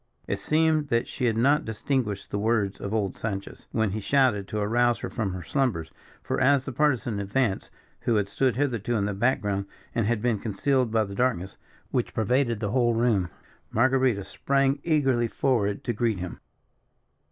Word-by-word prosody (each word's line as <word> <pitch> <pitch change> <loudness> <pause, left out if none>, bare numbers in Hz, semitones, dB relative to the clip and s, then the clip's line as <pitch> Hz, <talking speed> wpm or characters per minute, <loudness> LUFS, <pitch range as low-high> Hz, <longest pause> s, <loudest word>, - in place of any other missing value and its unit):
It - - -2
seemed 155 -1 +2
that 115 -3 +1
she 130 - -3
had 115 -2 +1
not 140 +6 +3
distinguished 110 -2 -2
the 100 - -1
words 105 -2 0
of 100 - -4
old 105 -4 -1
Sanchez, 100 -3 -5
when 110 -3 +1
he 110 - -2
shouted 120 -4 +2
to 105 - -4
arouse 120 +3 +2
her - - -4
from 110 -5 -2
her 90 -1 -6
slumbers; 115 - -1 0.3
for, - - -2
as 135 0 +4
the - - -4
Partisan 125 -6 +1
advanced, 100 +1 -1 0.3
who 115 - 0
had 105 -2 +1
stood 130 +4 +1
hitherto 120 -4 0
in 100 -2 +1
the 105 - -1
back 120 +7 +1
ground, 100 -1 -2 0.3
and 115 -3 0
had 120 -1 +1
been 115 -2 0
concealed 125 +5 0
by 110 0 +2
the 100 -1 -7
darkness 100 -5 -1 0.3
which - - -1
pervaded 120 +1 +1
the 105 -2 -1
whole 120 -1 +2
room. 110 -7 +2 0.4
Marguerita 130 -4 +2
sprang 140 +5 +1
eagerly 135 -7 +2
forward 110 -5 0
to 120 - -1
greet 115 -2 0
him. 90 0 -6
115 Hz, 185 wpm, -26 LUFS, 100-130 Hz, 0.4 s, as